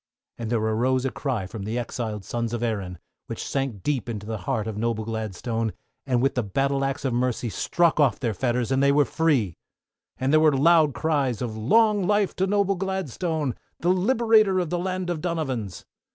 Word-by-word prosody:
And 115 -2 -4
there 120 - +1
arose 120 +4 +1
a 135 - 0
cry 125 -9 -2
from 100 +3 -7
the 110 +4 -3
exiled 115 -4 -4
sons 120 -1 -3
of 120 - -4
Erin, 100 -6 -2 0.3
which - - -5
sank 135 -8 -2
deep 135 -5 -1
into 105 -3 -5
the 110 -1 -4
heart 110 -2 0
of 110 -2 -4
noble 110 0 -1
Gladstone, 110 +1 -3 0.3
and 125 -2 +1
with 135 - +2
the 125 - 0
battle 135 +6 0
axe 135 +1 -2
of 130 - 0
Mercy 120 -1 0
struck 170 - +1
off 135 -9 +3
their 115 -4 -1
fetters 120 +2 -1
and 135 0 +2
they 140 0 +5
were 145 0 +4
free! 135 - +1 0.6
And 130 +3 0
there 155 - +7
was 155 -2 +4
loud 155 -1 +4
cries 140 -8 0
of 120 -3 -4
"Long 205 - +3
life 205 -1 +2
to 190 - +1
noble 200 0 +2
Gladslone, 175 -6 -2 0.3
the 175 - +1
Liberator 215 0 +3
of 175 -4 -2
the 175 - 0
Land 185 0 -2
of 160 -3 -3
Donovans!" 135 - -3
130 Hz, 195 wpm, -25 LUFS, 115-165 Hz, 0.6 s, there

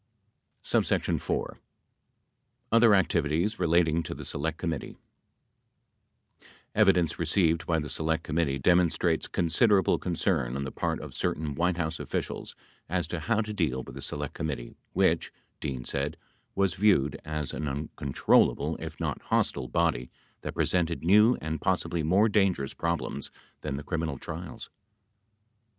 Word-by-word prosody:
1 - - +3
4. - - -1 1.1
OTHER 115 -2 +6
ACTIVITIES 85 +2 +1
RELATING 85 -2 +3
TO 80 - -6
THE - - -8
SELECT 80 +2 -2
COMMITTEE 80 -5 -4 1.8
Evidence 95 -6 +3
received 85 -2 +2
by 80 - +2
the 75 -1 -2
Select 80 +3 -1
Committee 75 -4 0
demonstrates 85 +1 +2
consider 90 +6 +3
able 95 - +2
concern 85 -8 0
on 70 - -2
the 65 - -4
part - - -2
of - - -8
certain 75 -1 -2
White 85 +3 0
House 80 -2 -2
officials - - -4 0.3
as 90 0 0
to 90 - -3
how 110 +7 +1
to 105 -1 -4
deal 70 -10 -1
with - - -10
the - - -8
Select 75 -1 -3
Committee, 70 -6 -4 0.2
which, - - +2 0.3
Dean 65 -4 -4
said, 70 +4 -2 0.4
was 95 -2 +2
viewed 90 -9 +2
as 75 -1 -3
an 75 - -3
un 70 +2 -3
controllable, 70 -2 +2
if - - -7
not - - -2
hostile, 65 - 0
body 70 -3 0 0.3
that - - -5
presented 85 -3 0
new 105 +7 +5
and 80 -1 -3
possibly 85 - 0
more 95 +8 +4
dangerous 95 -10 +1
problems 85 0 -3 0.3
than 70 -3 -3
the 70 - -6
criminal 80 -3 -2
trials. - - -7
80 Hz, 140 wpm, -28 LUFS, 75-90 Hz, 1.8 s, OTHER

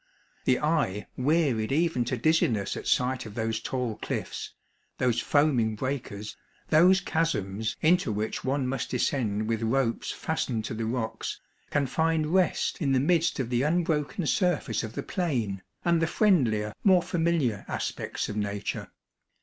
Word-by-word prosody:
The 125 - +3
eye 150 - 0
wearied 135 -5 +1
even 155 -4 +1
to 125 +1 -1
dizziness 115 -8 +2
at - - -6
sight 125 -1 +1
of 105 - -10
those 110 -1 -1
tall 120 -2 -3
cliffs, - - -4 0.5
those 120 -2 +1
foaming 130 -7 +2
breakers, 110 -4 -4 0.3
those 180 +4 +6
chasms 110 - -1
into 170 -5 +3
which 105 +1 -3
one 135 0 0
must 135 +1 -2
descend 110 -7 0
with 115 -1 -1
ropes 115 +1 0
fastened 125 -8 -2
to - - -4
the 110 0 -3
rocks, 115 -1 -3 0.3
can 145 -1 +1
find 160 +3 0
rest 185 -1 +1
in 140 -3 +2
the 130 - +4
midst 165 +2 +2
of 125 -2 -2
the 120 0 +2
unbroken 160 +3 0
surface 180 0 +1
of 110 -1 -6
the - - -4
plain, 120 - -2 0.2
and 170 -1 +3
the 165 - +2
friendlier, 120 - +2
more 185 -3 +5
familiar 165 - 0
aspects - - -3
of 105 - -5
nature. 105 -1 -3
130 Hz, 150 wpm, -27 LUFS, 110-160 Hz, 0.5 s, those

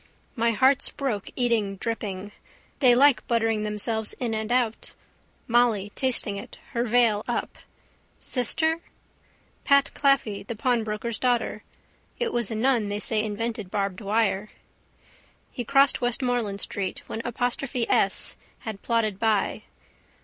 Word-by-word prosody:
My 235 -1 +2
heart's 260 +4 +3
broke 245 -9 -3
eating 230 -5 +1
dripping. 205 -2 -4 0.5
They 250 -4 +6
like 275 +1 +4
buttering 225 -2 +1
themselves 215 +1 0
in 240 -3 -3
and 220 +1 -3
out. 240 -3 0 0.5
Molly 230 -4 +2
tasting 240 -6 +1
it, 200 - -9
her 235 -1 0
veil 230 -3 +3
up. 240 - -3 0.6
Sister? 320 +6 +1 0.8
Pat 280 0 +4
Claffey, 275 -8 +2
the 225 +3 -6
pawnbroker's 225 -2 -1
daughter. 245 -2 0 0.6
It 485 - -1
was 235 -4 0
a 225 - -3
nun 230 -2 +1
they 205 - -2
say 215 0 +1
invented 220 -1 -3
barbed 200 0 -2
wire. 210 -1 0 1.0
He 245 - -4
crossed 275 +3 +3
Westmoreland 245 -4 0
street 190 -2 -3
when 225 - -5
apostrophe 245 +1 -1
S - - +2 0.3
had 215 -3 -6
plodded 220 -4 0
by. 220 -3 0
230 Hz, 130 wpm, -25 LUFS, 210-245 Hz, 1.0 s, They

